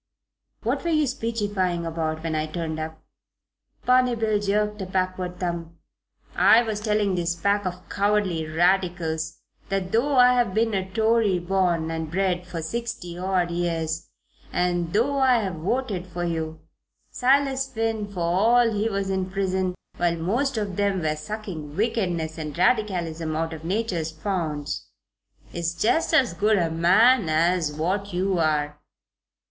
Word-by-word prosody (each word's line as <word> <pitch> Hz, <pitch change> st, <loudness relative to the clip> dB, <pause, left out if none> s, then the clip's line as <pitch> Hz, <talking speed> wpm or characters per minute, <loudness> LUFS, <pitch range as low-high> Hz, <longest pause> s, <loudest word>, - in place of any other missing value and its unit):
"What -, -, -1 dB
were 340 Hz, -, -1 dB
you 305 Hz, -2 st, +3 dB
speechifying 205 Hz, -9 st, -1 dB
about 160 Hz, -1 st, -3 dB
when 165 Hz, -1 st, -2 dB
I 155 Hz, 0 st, -1 dB
turned 160 Hz, -1 st, -4 dB
up?" 160 Hz, 0 st, -6 dB, 0.8 s
Barney 250 Hz, -1 st, +4 dB
Bill 220 Hz, -2 st, +1 dB
jerked 210 Hz, +1 st, 0 dB
a 190 Hz, -, -4 dB
backward 185 Hz, -1 st, -2 dB
thumb. 170 Hz, -2 st, -4 dB, 0.6 s
"I 235 Hz, +2 st, +6 dB
was 220 Hz, -2 st, -3 dB
telling 210 Hz, -2 st, +1 dB
this 175 Hz, -1 st, 0 dB
pack 200 Hz, +3 st, +1 dB
of 180 Hz, 0 st, -7 dB
cowardly 200 Hz, -5 st, 0 dB
Radicals 165 Hz, -1 st, 0 dB, 0.3 s
that 190 Hz, -1 st, -2 dB
though 275 Hz, +5 st, +2 dB
I've 245 Hz, -5 st, +4 dB
been 225 Hz, 0 st, +2 dB
a 190 Hz, -1 st, -1 dB
Tory 220 Hz, -2 st, +2 dB
born 175 Hz, -2 st, 0 dB
and 160 Hz, -1 st, -3 dB
bred 180 Hz, 0 st, 0 dB
for 170 Hz, -3 st, -5 dB
sixty 200 Hz, -3 st, -4 dB
odd 180 Hz, -1 st, 0 dB
years, 165 Hz, -2 st, -2 dB, 0.4 s
and 175 Hz, -1 st, 0 dB
though 275 Hz, +8 st, +1 dB
I've 235 Hz, -9 st, +2 dB
voted 195 Hz, +1 st, -2 dB
for 175 Hz, -1 st, -4 dB
you, 160 Hz, -2 st, -3 dB, 0.5 s
Silas 270 Hz, +1 st, +2 dB
Finn, 225 Hz, -3 st, -1 dB
for 185 Hz, -3 st, -5 dB
all 225 Hz, +8 st, +4 dB
he 210 Hz, +1 st, 0 dB
was 195 Hz, -2 st, -2 dB
in 190 Hz, -1 st, -1 dB
prison 190 Hz, -1 st, -1 dB, 0.2 s
while 175 Hz, -1 st, +1 dB
most 230 Hz, -, -1 dB
of 205 Hz, -4 st, -3 dB
them 200 Hz, -3 st, +1 dB
were 155 Hz, -1 st, +1 dB
sucking 155 Hz, -3 st, -6 dB
wickedness 180 Hz, -8 st, -1 dB
and 150 Hz, 0 st, -5 dB
Radicalism 175 Hz, -7 st, +1 dB
out 165 Hz, +1 st, -2 dB
of 160 Hz, -1 st, -8 dB
Nature's 180 Hz, -3 st, -1 dB
founts, 155 Hz, -4 st, -3 dB, 0.7 s
is 170 Hz, 0 st, -2 dB
just 320 Hz, -, +1 dB
as 270 Hz, -, +4 dB
good 210 Hz, +4 st, +2 dB
a 170 Hz, -3 st, +1 dB
man 185 Hz, +5 st, +4 dB
as 165 Hz, 0 st, +2 dB
what 185 Hz, +7 st, -2 dB
you 185 Hz, 0 st, 0 dB
are. 150 Hz, -2 st, 0 dB
185 Hz, 150 wpm, -25 LUFS, 165-215 Hz, 0.8 s, I